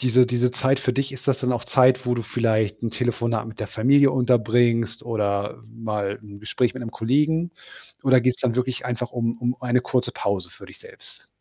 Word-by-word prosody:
diese 125 0 +4
diese 125 0 +1
Zeit 130 +2 +1
für 125 -2 0
dich, 135 +1 -2
ist 130 -1 -10
das 135 -2 +1
dann 125 -1 0
auch 120 -1 -3
Zeit, 130 0 +3
wo 125 - +2
du 120 - -3
vielleicht 110 -2 0
'n 115 - -1
Telefonat 115 -3 -1
mit 110 - -12
der 105 - -3
Familie 135 +7 +4
unterbringst 120 -2 +2
oder 105 -3 -2
mal, 105 -3 -4
'n 100 -1 -12
Gespräch 120 +3 -1
mit 130 - -6
'nem 115 - -6
Kollegen 150 +10 +1 0.5
oder 130 -2 +5
geht's 125 +1 0
dann 125 -3 0
wirklich 125 0 -2
einfach 125 0 -3
um 115 -1 -1
um 120 +1 -1
eine 125 0 +1
kurze 125 -1 -1
Pause 95 -5 -2
für - - -14
dich - - -15
selbst? - - -16
120 Hz, 205 wpm, -23 LUFS, 115-130 Hz, 0.5 s, oder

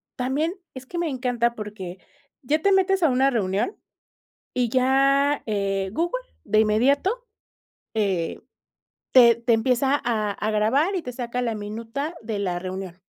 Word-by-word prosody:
también 280 +7 -1 0.2
es 260 -1 -9
que 345 - -7
me 340 -1 0
encanta, 245 -3 0
porque 205 -4 -7 0.4
ya 295 +3 +1
te 400 - +3
metes 385 -1 +3
a 320 - +5
una 265 +1 +3
reunión 210 - -1 0.8
y 245 -2 +1
ya, 275 +3 +3
eh, 195 -2 -1
Google 345 - -1 0.2
de 215 - +2
inmediato, 280 - +2 0.7
eh, 195 -6 -1 0.7
te 235 -3 +7
te 235 0 +1
empieza 255 +5 +2
a 215 -3 0
a 215 +2 -2
grabar 265 - +2
y 365 - -1
te 250 - -5
saca 245 0 -3
la 235 -2 -1
minuta 225 +9 -5
de 220 -2 -4
la 180 -3 -1
reunión. 185 -1 -6
245 Hz, 150 wpm, -24 LUFS, 215-280 Hz, 0.8 s, te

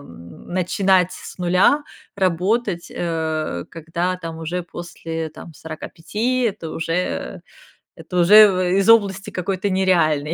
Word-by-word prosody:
н 85 - -14
начинать 185 0 +2
с - - -10
нуля 185 +12 +3 0.3
работать, 190 +1 0
э, 160 - -2
когда 170 +3 -3
там 165 -2 -7
уже 170 +2 -3
после 165 -1 -6
там 155 +1 -12
45- 165 - -3
это 200 -8 -2
уже 165 +2 -3 0.6
это 180 - -6
уже 185 -1 +6
из 195 +1 +2
области 200 -4 +3
какой-то 190 +2 -2
нереальной, 165 -5 +2
180 Hz, 115 wpm, -21 LUFS, 165-190 Hz, 0.6 s, уже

